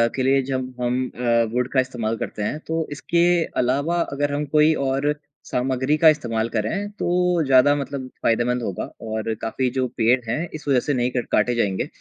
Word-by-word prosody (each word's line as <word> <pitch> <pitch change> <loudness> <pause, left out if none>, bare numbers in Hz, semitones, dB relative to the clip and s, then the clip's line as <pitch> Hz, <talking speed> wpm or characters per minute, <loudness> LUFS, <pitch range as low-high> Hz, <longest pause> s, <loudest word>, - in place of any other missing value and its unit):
के 130 - 0
लिए 135 +1 +3
जब 130 -1 -3
हम 125 +1 0
अ, 120 -1 +2
वुड 125 0 +1
का 135 - +3
इस्तेमाल 120 -4 -1
करते 105 - -4
हैं 150 +8 -2
तो 160 0 -1
इसके 170 +4 +1 0.4
अलावा 145 +8 0
अगर 145 -2 -2
हम 145 +1 -1
कोई 155 +1 +5
और 140 +2 +1 0.3
सामग्री 130 +3 0
का 160 +1 +7
इस्तेमाल 115 -7 0
करें, 195 - -2
तो 180 -4 +1
ज़्यादा 135 +1 +5
मतलब 140 -2 -4 0.2
फायदेमंद 120 +2 +1
होगा 95 -5 -3 0.2
और 110 0 -3
काफ़ी 125 +3 -1
जो 130 -1 +1
पेड़ 120 +3 +4
हैं 150 +9 -1
इस 155 -1 -8
वजह 135 -3 +4
से 145 - -1
नहीं 125 -1 +1
कट 125 -1 -2
काटे 125 - +2
जाएँगे। 100 -5 0
130 Hz, 190 wpm, -22 LUFS, 120-145 Hz, 0.4 s, का